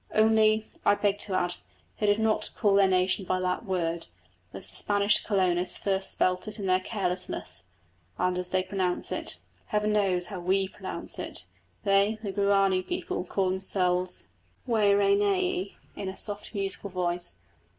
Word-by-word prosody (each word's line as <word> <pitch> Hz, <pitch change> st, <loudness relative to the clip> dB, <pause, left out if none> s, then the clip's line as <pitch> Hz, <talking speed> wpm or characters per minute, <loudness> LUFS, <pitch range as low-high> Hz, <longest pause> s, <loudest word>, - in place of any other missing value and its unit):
Only, 220 Hz, 0 st, +4 dB, 0.2 s
I 205 Hz, -, +5 dB
beg 205 Hz, 0 st, +1 dB
to 195 Hz, -, -2 dB
add, 175 Hz, -1 st, +1 dB, 0.4 s
they 210 Hz, -, +1 dB
do -, -, -6 dB
not 220 Hz, -1 st, +1 dB
call 205 Hz, -3 st, +3 dB
their 195 Hz, -1 st, +6 dB
nation 185 Hz, +1 st, +2 dB
by 185 Hz, 0 st, 0 dB
that 185 Hz, +5 st, -1 dB
word, 170 Hz, -3 st, -1 dB, 0.4 s
as -, -, -4 dB
the -, -, -13 dB
Spanish 205 Hz, 0 st, +2 dB
colonists 185 Hz, -3 st, +1 dB
first 195 Hz, -1 st, 0 dB
spelt 180 Hz, +3 st, +1 dB
it 215 Hz, -, -4 dB
in 200 Hz, -, -4 dB
their 185 Hz, 0 st, +3 dB
carelessness, 185 Hz, -2 st, -3 dB, 0.6 s
and 180 Hz, 0 st, +1 dB
as 180 Hz, 0 st, -2 dB
they 185 Hz, 0 st, +1 dB
pronounce 185 Hz, -1 st, -2 dB
it. -, -, -4 dB, 0.3 s
Heaven 210 Hz, 0 st, +1 dB
knows 190 Hz, -4 st, +2 dB
how 195 Hz, -2 st, -6 dB
we 190 Hz, +2 st, +1 dB
pronounce -, -, -7 dB
it! -, -, -6 dB, 0.4 s
They, 200 Hz, +1 st, +3 dB
the 200 Hz, -, -2 dB
Guarani 195 Hz, -1 st, +3 dB
people, 360 Hz, -, -3 dB
call 190 Hz, -2 st, 0 dB
themselves 185 Hz, -1 st, -1 dB, 0.4 s
Wä 215 Hz, -4 st, +3 dB
rä 200 Hz, 0 st, +4 dB
nä 200 Hz, -1 st, +3 dB
eé, 185 Hz, +2 st, -1 dB, 0.2 s
in 195 Hz, -, -4 dB
a 190 Hz, -, -8 dB
soft 205 Hz, -1 st, -5 dB
musical 195 Hz, 0 st, -2 dB
voice. 175 Hz, -1 st, -2 dB
195 Hz, 170 wpm, -28 LUFS, 185-205 Hz, 0.6 s, their